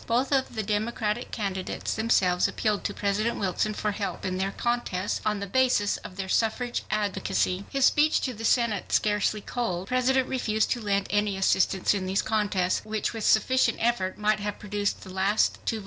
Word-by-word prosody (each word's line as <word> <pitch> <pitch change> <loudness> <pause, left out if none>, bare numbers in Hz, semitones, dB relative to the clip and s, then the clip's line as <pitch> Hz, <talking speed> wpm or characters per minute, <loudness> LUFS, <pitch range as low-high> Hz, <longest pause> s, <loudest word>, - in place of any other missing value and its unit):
Both 250 +4 +1
of 265 -3 +1
the 220 - -1
Democratic 215 +2 -1
candidates 195 -3 -3
themselves 190 -5 +2
appealed 210 -2 -1
to - - 0
President 210 +3 0
Wilson 205 +2 -1
for 210 - -1
help 200 0 -4
in 185 0 -2
their 190 +1 0
contests, 210 -5 -2
on 210 -1 0
the 200 - -3
basis 225 -1 +2
of 185 - -10
their 190 0 -4
suffrage 235 +4 0
advocacy. 200 -2 -1
His 275 -1 +2
speech 305 +1 +4
to 255 - -2
the 225 0 -9
Senate 225 -4 +1
scarcely 210 0 +1
cold, 195 -7 -3
the - - -16
President 255 +1 +2
refused 220 -4 0
to 240 - 0
lend 200 -2 0
any 205 -1 +1
assistance 190 0 +2
in 190 -2 -2
these 190 +2 +1
contests, 200 -4 0
which 215 0 -2
with 225 -2 -5
sufficient 235 +3 +3
effort 225 -5 0
might 210 0 +1
have 205 0 -4
produced 205 0 -2
the 190 - -10
last 195 +3 +1
two 230 - +1
votes. - - -4
210 Hz, 190 wpm, -27 LUFS, 195-235 Hz, -, speech